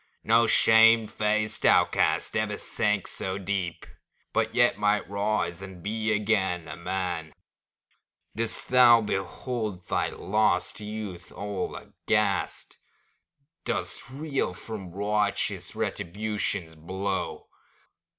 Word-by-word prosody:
No 115 +1 +4
shame 115 0 +6
faced 110 +1 -1
outcast - - +3
ever - - 0
sank 105 -2 0
so 95 0 -2
deep, 95 -3 -3 0.5
But - - 0
yet - - +4
might 105 0 +2
rise 100 -3 -1
and 95 -3 -10
be 110 +1 -1
again 100 -5 +1
a - - -6
man! 90 -4 -3 1.0
Dost 115 0 -2
thou 120 -2 +7
behold 105 -1 -3
thy - - 0
lost 95 -2 0
youth 105 -4 -6
all 100 -2 -4
aghast? 105 -3 -1 0.8
Dost - - -3
reel 140 -8 -2
from 100 -3 -7
righteous 105 +2 -1
Retribution's 100 -2 -3
blow? 95 +4 -4
105 Hz, 100 wpm, -27 LUFS, 95-110 Hz, 1.0 s, thou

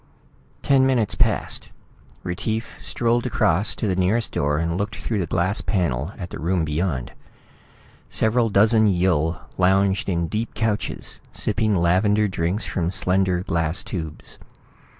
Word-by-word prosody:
Ten 135 -1 +4
minutes 120 -6 +2
passed. - - 0 0.5
Retief 110 +6 -3
strolled 120 +1 0
across 95 -4 +2
to - - -3
the 95 -3 +1
nearest 95 +6 +1
door 75 +1 0
and 85 +1 -1
looked 100 +3 -2
through 110 -3 -3
the 90 - -1
glass 95 +6 0
panel 85 - -1
at 90 -3 -7
the - - -6
room 85 +2 0
beyond. 75 -4 -2 1.0
Several 115 +1 +1
dozen 110 +2 +4
Yill 85 -4 +1 0.2
lounged 95 +2 +2
in 85 -2 0
deep 110 +6 -3
couches, 110 -2 -2
sipping 110 0 0
lavender 100 +5 +3
drinks 90 +2 -2
from 85 -3 -1
slender 90 -1 +1
glass 85 0 -1
tubes. 80 -5 -7
95 Hz, 135 wpm, -23 LUFS, 85-110 Hz, 1.0 s, Ten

